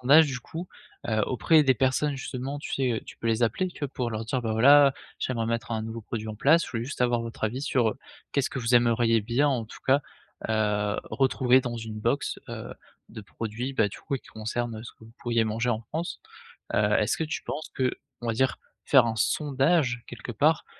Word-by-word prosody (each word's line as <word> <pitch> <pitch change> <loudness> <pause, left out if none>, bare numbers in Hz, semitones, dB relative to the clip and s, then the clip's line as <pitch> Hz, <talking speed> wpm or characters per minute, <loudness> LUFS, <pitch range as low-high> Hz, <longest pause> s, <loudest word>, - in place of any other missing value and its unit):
sondage 145 +5 +7
du 135 -3 -4
coup, 170 +7 -7 0.4
heu, 110 -2 +1
auprès 155 +5 +4
des 130 -2 +4
personnes 135 +4 +1
justement 135 +1 -5
tu - - -7
sais? 130 -2 +1
Heu, 110 - -2
tu - - -11
peux - - -5
les 115 +1 +1
appeler 180 - 0
tu 175 - -14
vois, 145 - -1
pour 125 -3 -3
leur 110 0 -3
dire: 125 +2 -2
«Bah 110 -2 -1
voilà, 140 +5 +7 0.3
j'aimerais 115 -3 -1
mettre 115 0 -2
un 110 -1 -1
nouveau 115 +1 -5
produit 110 0 -5
en 110 - -4
place, 160 +8 +4
je - - -9
voulais 115 -1 -2
juste 135 - -7
avoir 120 -1 +2
votre 115 -1 -5
avis 125 +6 -2
sur, 120 -6 +2
heu, - - -9 0.3
qu'est-ce 140 -1 +1
que - - -4
vous 120 0 +1
aimeriez 115 -1 +4
bien, 120 +7 +1
en 125 -5 0
tout 110 - -12
cas, 135 +2 +5 0.5
heu, 105 -1 +1
retrouver 130 -1 +3
dans 120 -2 -4
une 110 -1 -6
box, 120 +6 0
heu, - - -7 0.4
de 110 - -8
produits, 115 +5 -5
bah, 105 - +3
du - - -10
coup, - - -4
oui, 135 - -3
qui - - -19
concernent 110 +1 -4
ce 115 - -9
que 110 - -18
vous 115 - -15
pourriez 115 -1 +1
manger 115 +3 0
en 110 -1 0
France?» 160 +9 -5 0.5
heu, 105 0 +3
est-ce 105 - +1
que 160 - -1
tu 155 - -4
penses 155 - -5
que, 130 -1 +1 0.3
on 120 - -4
va 115 - +1
dire 130 +1 +1 0.3
faire - - +6
un 115 - -2
sondage, 135 -1 +1
quelque 120 0 -7
part, 150 +8 +2
120 Hz, 230 wpm, -27 LUFS, 110-135 Hz, 0.5 s, sondage